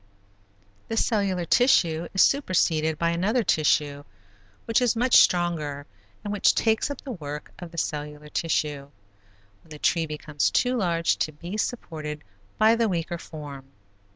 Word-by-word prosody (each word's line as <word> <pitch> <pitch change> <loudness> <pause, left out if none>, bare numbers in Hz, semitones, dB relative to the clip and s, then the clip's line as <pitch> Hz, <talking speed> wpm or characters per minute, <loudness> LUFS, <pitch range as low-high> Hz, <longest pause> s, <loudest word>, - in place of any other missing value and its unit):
This 225 - +1
cellular 195 -6 0
tissue 170 -9 +3
is 190 - +4
superseded 165 - +1
by 170 +1 +1
another 205 +8 +1
tissue 150 -4 +1 0.6
which 230 +1 +2
is 245 -2 +2
much 245 +2 +4
stronger 155 -5 +2 0.4
and 205 - -3
which 205 - +3
takes 225 +4 +1
up 285 - -6
the 275 - -7
work 150 -7 -7
of 175 -2 -8
the 170 - -13
cellular 150 -1 -4
tissue, 150 -3 -2 0.7
when - - -24
the 150 - -9
tree 165 +2 +1
becomes 150 -1 -1
too 250 0 +1
large 170 -7 +1
to 155 - -1
be 170 +6 -8
supported 155 -10 -4 0.3
by 220 +1 +5
the 230 -1 +1
weaker 170 -1 -3
form. 145 -5 -9
170 Hz, 150 wpm, -25 LUFS, 150-215 Hz, 0.7 s, by